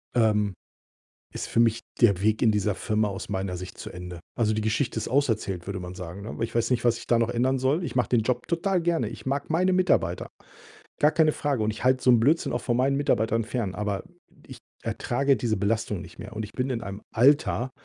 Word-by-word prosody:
ähm, 105 -4 +2 0.8
ist - - -4
für 115 - +2
mich 115 -1 +3 0.2
der 100 -6 +5
Weg 110 +1 +2
in 115 - +5
dieser 105 -1 0
Firma 110 +1 0
aus 100 0 -6
meiner 95 -2 -2
Sicht 90 +1 -8
zu - - -7
Ende. 90 -1 -8 0.2
Also, 110 -2 +1
die 110 - -1
Geschichte 115 +3 0
ist - - -4
auserzählt, 110 -9 0
würde 100 -1 -4
man 90 0 -7
sagen, 90 +2 -7
ne? 110 - -6
Weil - - -2
ich 115 - -3
weiß 115 +1 +1
nicht, 125 - +1
was 120 -1 +3
ich - - -11
da 120 - +3
noch 115 0 +1
ändern 125 +2 +1
soll. 135 +7 +1
Ich - - -6
mache 125 -4 +1
den 120 -2 +3
Job 120 +2 -1
total 180 +2 0
gerne. 165 -9 +1
Ich 115 +1 -9
mag 140 +3 -2
meine 180 +4 +2
Mitarbeiter. 180 - +1 0.7
Gar 150 - +5
keine 155 -1 +3
Frage. 140 -7 -1
Und 110 - +1
ich 110 - -7
halte 130 0 +3
so 125 - +5
'n 120 - +5
Blödsinn 150 +8 +2
auch 120 0 -2
von 120 - 0
meinen 135 +2 +2
Mitarbeitern 115 -5 +1
fern, 110 -5 -3
aber 105 -2 -2 0.4
ich - - -10 0.2
ertrage 135 +2 +1
diese 110 -1 0
Belastung 105 -1 -1
nicht 90 -2 -12
mehr. - - -8
Und 110 - -3
ich 105 - -10
bin 130 +1 -2
in 120 -3 -1
einem 100 -1 -7
Alter, 130 0 +3
115 Hz, 235 wpm, -26 LUFS, 105-130 Hz, 0.8 s, der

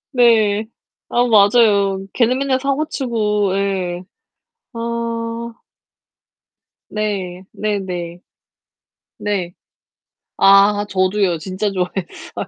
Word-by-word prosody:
네. 220 -3 +3 0.4
아 245 +1 +2
맞아요. 200 -3 +4
걔는 245 +1 +2
맨날 265 -1 0
사고치고 235 -8 -1
예. 185 -3 -2 0.7
아. 230 - -5 2.1
네 190 -4 -3
네네. 180 -5 -4 1.0
네. 190 -4 -2 0.8
아 200 +1 +5
저도요. 185 -1 +1
진짜 190 +4 -3
좋아했어요. 180 -1 -5
205 Hz, 145 characters per minute, -19 LUFS, 185-220 Hz, 2.1 s, 아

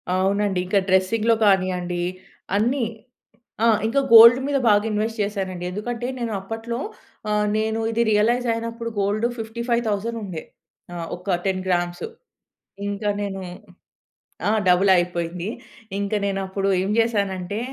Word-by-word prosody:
అవునండి. 195 0 +1
ఇంకా 195 +2 +2
డ్రెసింగ్‌లో 215 +5 +3
కానీయండి, 180 -2 +1 0.5
అన్ని. 240 +3 +1 0.8
ఆ! - - +5 0.2
ఇంకా 275 +5 +2
గోల్డ్ 235 +2 +10
మీద 285 -1 +1
బాగా 205 0 +4
ఇన్‌వెస్ట్ 220 +2 -2
చేసానండి. 190 -3 -3
ఎందుకంటే, 235 +5 -4
నేను 230 -2 -3
అప్పట్లో 225 +4 -5 0.5
ఆహ్, 210 0 +1
నేను 220 +1 0
ఇది 230 +1 +1
రియలైజ్ 240 +4 +2
అయినప్పుడు 230 0 -4
గోల్డ్ 210 +4 +1
55,000 230 -1 -2
ఉండే. 170 -5 -6 0.5
ఆ! - - -6 0.2
ఒక 180 0 -1
10 185 -1 0
గ్రామ్స్. 175 - -1 0.8
ఇంకా 205 +1 -2
నేను 195 -1 -4 1.1
ఆ! - - +3 0.2
డబుల్ 185 +2 +4
అయిపోయింది. 175 +1 -2 0.5
ఇంక 200 +1 -3
నేనప్పుడు 195 0 -2
ఏం 195 - -2
జేసానంటే, 200 -3 0
205 Hz, 120 wpm, -23 LUFS, 190-230 Hz, 1.1 s, గోల్డ్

